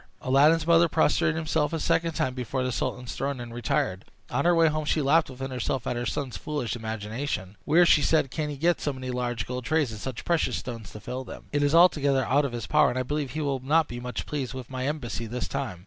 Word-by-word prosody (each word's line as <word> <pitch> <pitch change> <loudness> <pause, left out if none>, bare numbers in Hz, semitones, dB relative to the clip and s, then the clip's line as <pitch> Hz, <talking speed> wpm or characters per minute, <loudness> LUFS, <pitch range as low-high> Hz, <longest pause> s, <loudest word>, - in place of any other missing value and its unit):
Aladdin's 150 +5 +4
mother 170 0 +5
prostrated 155 +1 +2
herself 155 0 0
a 165 - -1
second 165 +2 +1
time 155 -5 -1
before 130 +1 -3
the 130 - -1
sultan's 125 +1 -3
throne, 140 -1 -2
and 120 -1 -7
retired. 95 -5 -1 0.3
On - - 0
her 175 0 +5
way 165 -1 +5
home 155 0 -1
she 155 - +1
laughed 150 +2 +3
within 135 +1 -6
herself 125 0 -2
at - - -1
her 120 0 -2
son's 125 -1 -3
foolish 135 +1 -3
imagination. 110 -2 -4
"Where," 170 +4 +5
said 155 -1 +4
she, - - -17
"can 150 +2 -3
he 145 - -5
get 170 +3 +1
so 145 - -1
many 130 -1 -5
large 120 -2 -2
gold 125 0 -4
trays, 155 -6 +1
and 110 - -7
such 130 -3 -5
precious 170 -2 +1
stones 115 -5 -7
to 105 - -8
fill 130 +5 -5
them? - - -11
It 145 - +1
is 145 +2 +2
altogether 145 -7 +4
out 140 +4 +3
of 135 - -3
his 120 -2 -4
power, - - +4
and 125 - -3
I 130 - 0
believe 145 0 -3
he 155 - -2
will 140 -3 -1
not 150 +5 +2
be 120 - -6
much 125 0 -5
pleased 135 -4 -4
with 130 -1 -8
my 130 0 -2
embassy 120 -6 -3
this 125 +3 -4
time." 130 -11 -4
135 Hz, 245 wpm, -27 LUFS, 120-150 Hz, 0.3 s, mother